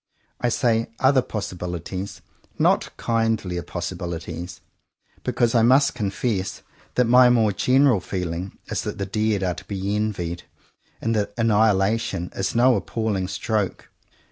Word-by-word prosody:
I 120 - +1
say 115 -1 +1
"other" 130 0 +4
possibilities, 90 -2 -5 0.4
not - - +2
kindlier 110 -6 0
possibilities, 85 0 -5 0.6
because 120 -1 +1
I 115 - +4
must 130 +5 +5
confess 100 -3 -2 0.3
that 125 - +4
my 125 +1 +7
more 115 -3 +4
general 130 +1 +3
feeling 90 0 -4
is - - -2
that - - -5
the 100 - -2
dead 105 0 0
are 90 -1 +1
to - - -10
be 100 0 -2
envied, 90 -5 -2 0.6
and 115 0 0
that 105 -1 -1
annihilation 105 -4 +2
is 95 +2 -2
no 125 +1 +5
"appalling 105 -5 -1
stroke." 100 +1 -2
105 Hz, 130 wpm, -23 LUFS, 95-115 Hz, 0.6 s, my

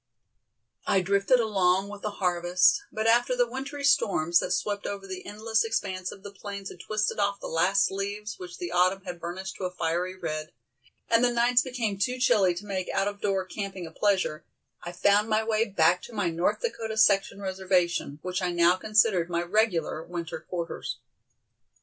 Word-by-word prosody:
I 190 - +3
drifted 200 +6 +3
along 195 -4 +2
with 205 0 -9
the 215 - -2
harvest, 180 - +2
but 220 - -3
after 240 +2 +3
the 245 -1 +2
wintry 275 +3 -6
storms 175 - +3
that - - -3
swept 205 -1 -2
over 200 -1 -5
the 185 -1 -7
endless 220 +1 0
expanse 190 -5 -2
of 195 - -13
the 200 - -8
plains 200 -1 -7
had 180 - -12
twisted 215 +3 -1
off 200 0 0
the - - -9
last 185 +4 +2
leaves 200 +2 -4
which 180 -1 -8
the 175 - -5
autumn 185 +2 +2
had 175 -2 -6
burnished 190 +3 -6
to 185 - -4
a - - -1
fiery 180 +1 -2
red, 155 -5 -5 0.5
and 230 +1 +3
the 245 - +4
nights 240 +1 +3
became 235 -7 -3
too 250 +5 0
chilly 200 -8 +3
to 205 - -7
make 190 -3 -3
out 195 0 0
of 205 0 -5
door 195 -2 0
camping 195 -2 -5
a 160 - -9
pleasure, 185 -5 0 0.4
I 175 - -6
found 200 +4 +3
my 215 0 +2
way 220 0 +1
back 180 -4 +2
to 240 - -11
my 200 -6 0
North 170 - 0
Dakota 225 - -3
section 200 -2 +3
reservation, 185 -5 0
which 185 +1 -2
I 180 - 0
now 175 +1 +4
considered 210 -4 +2
my 170 0 0
regular 175 -5 0
winter 170 -1 -6
quarters. 170 -1 -5
195 Hz, 185 wpm, -27 LUFS, 180-215 Hz, 0.5 s, the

